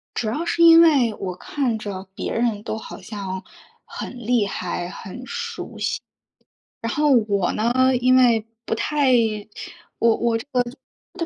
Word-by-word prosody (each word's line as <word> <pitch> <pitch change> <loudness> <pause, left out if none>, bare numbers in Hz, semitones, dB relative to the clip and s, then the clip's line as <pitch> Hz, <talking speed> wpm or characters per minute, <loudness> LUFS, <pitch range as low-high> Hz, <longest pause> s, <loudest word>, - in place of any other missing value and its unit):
主 225 - -1
要 295 +10 -2
是 340 0 0
因 330 0 +9
为 275 -9 +4
我 185 -3 -5
看 245 +2 -2
着 200 -2 -6
别 - - -4
人 230 -3 0
都 220 - -4
好 215 - -9
像 190 -1 -6 0.4
很 245 -3 -8
厉 235 -3 +2
害、 180 -2 -4
很 195 +6 -9
熟 - - -6
悉， - - -1 0.8
然 230 +1 -3
后 300 -1 +2
我 205 -6 +2
呢， 230 +3 +1 0.3
因 255 +1 +4
为 235 -4 +4 0.2
不 - - -1
太 290 +4 +1 2.1
我 355 -2 -3
230 Hz, 150 characters per minute, -22 LUFS, 205-255 Hz, 2.1 s, 因